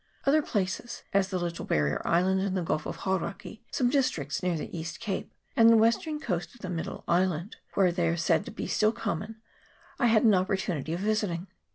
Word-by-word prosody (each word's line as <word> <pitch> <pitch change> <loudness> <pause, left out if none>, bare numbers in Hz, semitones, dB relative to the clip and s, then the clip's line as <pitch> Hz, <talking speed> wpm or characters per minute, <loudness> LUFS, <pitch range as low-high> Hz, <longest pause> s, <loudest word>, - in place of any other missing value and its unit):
Other 295 +3 +5
places 230 +1 -3
as 195 -1 +3
the 190 -1 -2
Little 170 -1 -3
Barrier 75 0 +1
Island 190 +3 +2
in 195 -1 -1
the 185 - 0
gulf 155 -2 -1
of - - -4
Hauraki, 190 +3 -3
some 245 -2 +1
districts 210 - 0
near 180 -2 0
the 155 - -6
East 160 0 -5
Cape 205 -5 -3 0.2
and 230 0 +7
the 230 - +7
western 235 +8 +2
coast 180 - -3
of 240 - -18
the 185 - -4
Middle 165 -2 -4
Island, 180 +1 +1 0.2
where 190 -3 +4
they 175 -1 0
are 170 +1 +1
said 170 +4 +2
to - - -7
be 225 - -5
still 215 +1 +2
common 215 +2 -4 0.6
I 245 - +4
had 225 0 +4
no 205 -4 +6
opportunity 185 -5 -1
of 175 - -3
visiting. 205 -5 0
190 Hz, 205 wpm, -28 LUFS, 170-220 Hz, 0.6 s, and